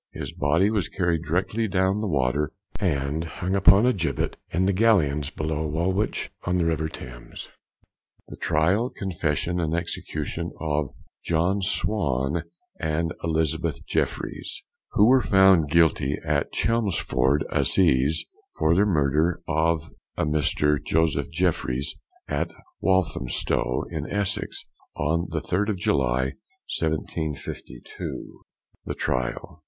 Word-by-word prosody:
His -, -, -5 dB
body 80 Hz, +8 st, +2 dB
was 100 Hz, -6 st, 0 dB
carried 85 Hz, -4 st, 0 dB
directly 95 Hz, +8 st, 0 dB
down 95 Hz, +1 st, +1 dB
the 110 Hz, -, -1 dB
water 70 Hz, -2 st, +1 dB, 0.3 s
and 75 Hz, -4 st, 0 dB
hung 90 Hz, +3 st, -3 dB
upon 95 Hz, +3 st, +6 dB
a 125 Hz, -, +4 dB
gibbet 80 Hz, -, -1 dB
in 90 Hz, +3 st, +1 dB
the 100 Hz, -, +2 dB
gallions 80 Hz, -10 st, +3 dB
below 80 Hz, -1 st, -2 dB
Woolwich, 95 Hz, +7 st, -1 dB
on 90 Hz, 0 st, 0 dB
the 85 Hz, -, +1 dB
river 80 Hz, -1 st, 0 dB
Thames. -, -, -9 dB, 0.8 s
THE -, -, -9 dB
TRIAL, 90 Hz, +11 st, +2 dB
CONFESSION, 90 Hz, -2 st, -1 dB
AND 80 Hz, -1 st, 0 dB
EXECUTION 85 Hz, -1 st, -4 dB
OF 75 Hz, -3 st, -1 dB, 0.3 s
JOHN 85 Hz, +5 st, +1 dB
SWAN 85 Hz, -6 st, 0 dB, 0.3 s
AND 80 Hz, +2 st, -1 dB
ELIZABETH 80 Hz, -2 st, -1 dB
JEFFRYES, -, -, -2 dB, 0.3 s
_Who 105 Hz, -, +6 dB
were 130 Hz, +1 st, +6 dB
found 95 Hz, -7 st, +5 dB
guilty 80 Hz, -4 st, +3 dB
at -, -, 0 dB
Chelmsford 80 Hz, -, +1 dB
Assizes 75 Hz, -5 st, +3 dB, 0.3 s
for 80 Hz, -, +3 dB
the 100 Hz, +4 st, +4 dB
murder 80 Hz, -1 st, +2 dB
of 80 Hz, 0 st, +1 dB, 0.3 s
Mr. 75 Hz, -1 st, +1 dB
Joseph 80 Hz, -1 st, +1 dB
Jeffryes, 65 Hz, +2 st, 0 dB, 0.3 s
at -, -, -1 dB, 0.3 s
Walthamstow, 95 Hz, -9 st, +1 dB
in -, -, -4 dB
Essex, 100 Hz, -2 st, -2 dB, 0.3 s
on 80 Hz, +4 st, 0 dB
the 80 Hz, -2 st, -2 dB
3rd 100 Hz, +4 st, 0 dB
of 105 Hz, -, 0 dB
July, 65 Hz, -, +1 dB, 0.5 s
1752._ 80 Hz, -1 st, -3 dB, 1.0 s
THE -, -, -4 dB
TRIAL. 65 Hz, +4 st, -2 dB
80 Hz, 120 wpm, -25 LUFS, 75-95 Hz, 1.0 s, upon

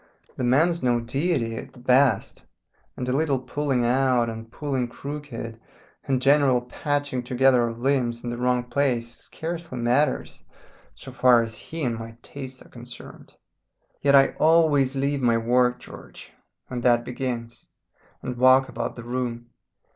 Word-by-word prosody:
The -, -, -4 dB
man's 160 Hz, +8 st, +2 dB
no 120 Hz, -1 st, +2 dB
deity 120 Hz, -1 st, -1 dB
at -, -, -8 dB
the -, -, -15 dB
best, 125 Hz, -2 st, +2 dB, 0.5 s
and 125 Hz, -, -4 dB
a 125 Hz, -, 0 dB
little 145 Hz, -2 st, +1 dB
pulling 130 Hz, 0 st, -1 dB
out, 125 Hz, -1 st, +2 dB
and 115 Hz, 0 st, -9 dB
pulling 135 Hz, -4 st, -2 dB
crooked, 125 Hz, -4 st, -7 dB, 0.5 s
and 130 Hz, -2 st, +1 dB
general 135 Hz, -2 st, +4 dB
patching 145 Hz, +1 st, -2 dB
together 125 Hz, 0 st, +3 dB
of 115 Hz, 0 st, -6 dB
limbs 120 Hz, -2 st, 0 dB
in 120 Hz, -, -3 dB
the 120 Hz, -, -4 dB
wrong 125 Hz, 0 st, +1 dB
place 120 Hz, -3 st, -1 dB
scarcely 165 Hz, -4 st, -6 dB
matters 125 Hz, +4 st, 0 dB, 0.5 s
so -, -, -11 dB
far 125 Hz, -2 st, +4 dB
as 110 Hz, -1 st, -7 dB
he 165 Hz, -1 st, -6 dB
and 115 Hz, -3 st, -1 dB
my 115 Hz, 0 st, -9 dB
taste 130 Hz, -2 st, -8 dB
are -, -, -19 dB
concerned. 120 Hz, 0 st, -12 dB, 0.7 s
Yet 140 Hz, 0 st, +4 dB
I 135 Hz, 0 st, +6 dB
always 155 Hz, -4 st, +4 dB
leave 140 Hz, +1 st, -1 dB
my 120 Hz, -2 st, +3 dB
work, 125 Hz, +2 st, +2 dB
George, -, -, -12 dB, 0.3 s
when 125 Hz, -1 st, -5 dB
that 120 Hz, -1 st, +3 dB
begins, 120 Hz, -2 st, -5 dB, 0.6 s
and 125 Hz, -1 st, -5 dB
walk 130 Hz, +1 st, +5 dB
about 115 Hz, -, -4 dB
the 120 Hz, -, -9 dB
room. 120 Hz, -1 st, -4 dB
125 Hz, 155 wpm, -24 LUFS, 120-140 Hz, 0.7 s, I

